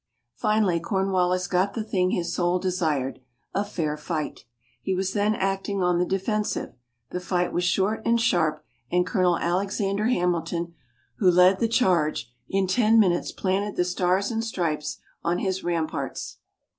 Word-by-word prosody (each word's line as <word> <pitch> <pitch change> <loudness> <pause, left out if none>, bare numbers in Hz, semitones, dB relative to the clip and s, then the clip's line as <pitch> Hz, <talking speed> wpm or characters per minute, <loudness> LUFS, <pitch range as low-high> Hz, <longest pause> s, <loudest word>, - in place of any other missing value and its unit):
Finally, 210 -6 +1
Cornwallis 185 0 +1
got 185 +2 +1
the 225 - -2
thing 185 -4 +1
his 175 -2 -1
soul 175 0 +1
desired 160 -9 -1 0.3
a 200 - +1
fair 160 -7 -2
fight. 155 0 -4 0.4
He 190 - -1
was 190 +1 -1
then 210 +1 +2
acting 195 0 -1
on 180 -1 +2
the 180 - +1
defensive. 210 +2 -1 0.4
The 180 - -2
fight 180 -1 -1
was 175 - 0
short 195 +5 +1
and 235 0 +2
sharp; 160 -8 +1 0.3
and 180 0 +3
Colonel 180 -5 +2
Alexander 195 +4 0
Hamilton, 170 -5 0 0.4
who 190 - +4
led 180 +2 +5
the 230 - +2
charge, 170 - +1 0.2
in 195 0 +1
ten 220 +4 +4
minutes 180 -5 +2
planted 195 +2 -1
the 180 - +1
Stars 180 +3 +1
and 225 0 -1
Stripes 165 -9 -2 0.3
on 170 +1 +1
his 190 0 -2
ramparts. 170 -2 -3
185 Hz, 155 wpm, -25 LUFS, 175-200 Hz, 0.4 s, led